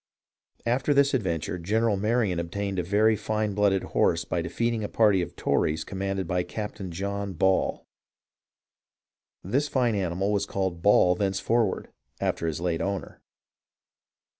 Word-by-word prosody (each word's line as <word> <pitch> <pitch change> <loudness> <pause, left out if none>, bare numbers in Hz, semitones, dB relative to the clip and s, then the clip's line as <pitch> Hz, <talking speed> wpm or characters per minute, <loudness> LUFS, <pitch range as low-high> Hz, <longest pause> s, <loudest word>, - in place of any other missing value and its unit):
"After 125 +5 +1
this 140 0 +4
adventure. 90 - -1
General 110 +5 +1
Marion 105 -3 +1
obtained 95 +3 -3
a - - 0
very 105 +4 +3
fine 105 0 -1
blooded 100 -1 +2
horse 85 0 +1
by 85 - -1
defeating 115 +7 -1
a 105 - -3
party 105 -4 +3
of 85 - -5
Tories 75 +1 0
com 95 - -7
manded 95 -1 -1
by 90 +2 0
Captain 95 +1 -5
John 100 +3 -3
Ball. 95 +2 +1 1.6
This 135 +11 0
fine 125 -5 +1
animal 95 0 -1
was 100 -1 0
called 95 -3 -2
Ball 90 -2 +5
thenceforward, 100 +3 0 0.3
after 85 - -1
his 80 -1 -2
late 85 -2 -1
owner. 100 -1 -4
100 Hz, 140 wpm, -26 LUFS, 90-110 Hz, 1.6 s, Ball